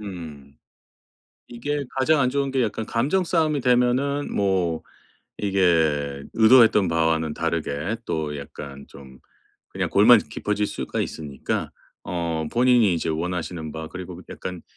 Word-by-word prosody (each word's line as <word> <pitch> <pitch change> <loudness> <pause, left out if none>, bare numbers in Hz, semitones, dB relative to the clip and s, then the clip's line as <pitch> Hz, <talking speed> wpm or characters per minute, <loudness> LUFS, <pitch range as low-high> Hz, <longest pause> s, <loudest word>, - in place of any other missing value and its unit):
음. 80 -9 -9 0.9
이게 145 +4 -3
가장 150 +2 +3
안 130 -1 +2
좋은 140 0 -1
게 130 -1 +1
약간 110 0 -2
감정싸움이 155 +3 +1
되면은 125 +3 +1
뭐 95 -5 0 0.6
이게 80 -8 +1
의도했던 110 -4 +6
바와는 80 -1 +1
다르게 85 +3 -2
또 75 -2 -3
약간 70 0 -9
좀 65 -2 -14 0.5
그냥 - - -3
골만 - - +7
깊어질 105 0 -2
수가 - - -4
있으니까 70 -4 -4 0.3
어 85 -2 -2
본인이 120 -5 +4
이제 80 0 -2
원하시는 85 -1 -3
바 80 0 -6
그리고 90 0 -8
그 - - -12
약간 90 -2 -7
90 Hz, 270 characters per minute, -23 LUFS, 80-120 Hz, 0.9 s, 골만